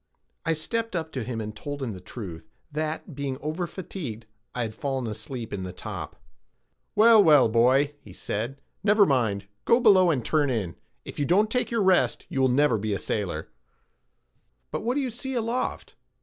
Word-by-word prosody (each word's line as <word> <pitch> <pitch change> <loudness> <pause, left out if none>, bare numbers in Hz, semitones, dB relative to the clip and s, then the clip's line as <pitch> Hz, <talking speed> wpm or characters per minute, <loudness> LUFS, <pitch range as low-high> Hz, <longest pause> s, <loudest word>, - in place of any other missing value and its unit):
I 165 - +3
stepped 225 +7 -2
up 160 -2 -2
to 130 -5 -3
him 120 -1 -4
and 110 -1 -5
told 145 +5 -5
him 120 - -2
the 95 -3 -8
truth, 90 -5 -8 0.2
that, 155 +2 -3
being 140 -1 -3
over 155 +4 -3
fatigued, 165 - -6 0.3
I 125 - 0
had 110 -1 -4
fallen 135 +1 -2
asleep 115 +2 -5
in 100 - -3
the 90 -1 -5
top. - - -6 0.8
"Well, 220 -1 +7
well, 150 -7 +6
boy," 130 +6 +3 0.2
said 110 +7 -4
he, - - -35 0.2
"never 210 0 +5
mind, 110 - +1 0.2
go 235 - +4
below, 195 -7 +6
and 130 -8 0
turn 150 -3 +2
in; 100 -9 -2 0.3
if - - -8
you 145 - +1
don't 205 +7 +3
take 250 +1 +1
your 230 -3 +1
rest, 180 -11 +3
you 135 -1 +2
never 130 -1 +3
will - - -6
be 110 -1 -1
a - - -1
sailor. 95 -9 -3 1.2
"But - - -2
what 240 +4 -1
do 290 - +1
you 260 -3 -2
see 265 +3 -4
aloft?" 235 +2 -2
140 Hz, 190 wpm, -26 LUFS, 115-190 Hz, 1.2 s, Well